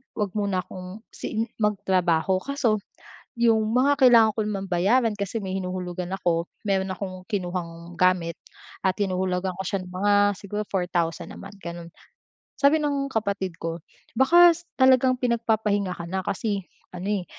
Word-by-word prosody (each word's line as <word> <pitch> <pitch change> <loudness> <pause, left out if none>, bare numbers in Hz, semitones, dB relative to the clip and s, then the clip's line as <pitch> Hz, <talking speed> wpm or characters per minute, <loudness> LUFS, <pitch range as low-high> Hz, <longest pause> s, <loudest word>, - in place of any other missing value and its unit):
huwag 205 -3 -1
muna 200 -3 0
kong, 185 +5 -9
siin 225 +1 -3
magtrabaho. 185 -4 +1
Kaso 250 -7 0 0.6
yung 225 -1 +2
mga 285 +3 +3
kailangan 230 -4 +7
ko 220 - -2
naman 195 -2 -3
bayaran, 210 +6 +2
kasi 200 +2 -3
may 190 0 -4
hinuhulugan 180 -1 -4
ako, 175 -3 0 0.2
meron 195 -1 0
akong 185 -1 -6
kinuhang 175 -3 -4
gamit 180 -2 +2 0.5
at 190 -1 +1
hinuhulugan 185 -2 -1
ko 190 - -5
siya 195 -2 -2
ng 180 - -11
mga 200 +3 +1 0.3
siguro 210 +1 -4
4,000 175 -3 -1
a - - -11
month, 200 +1 -10
ganon. 170 -1 -7 0.7
Sabi 295 +2 +4
ng 280 -1 0
kapatid 200 -6 -2
ko, 165 0 -3 0.4
"Baka 345 +6 +7
s 345 +1 -10
talagang 260 -1 +5
pinagpapahinga 220 -5 0
ka 170 - -7
na." 190 0 -1
Kasi 200 0 -1 0.3
ano, 180 +1 -6
eh, 200 -4 0
195 Hz, 150 wpm, -25 LUFS, 180-220 Hz, 0.7 s, kailangan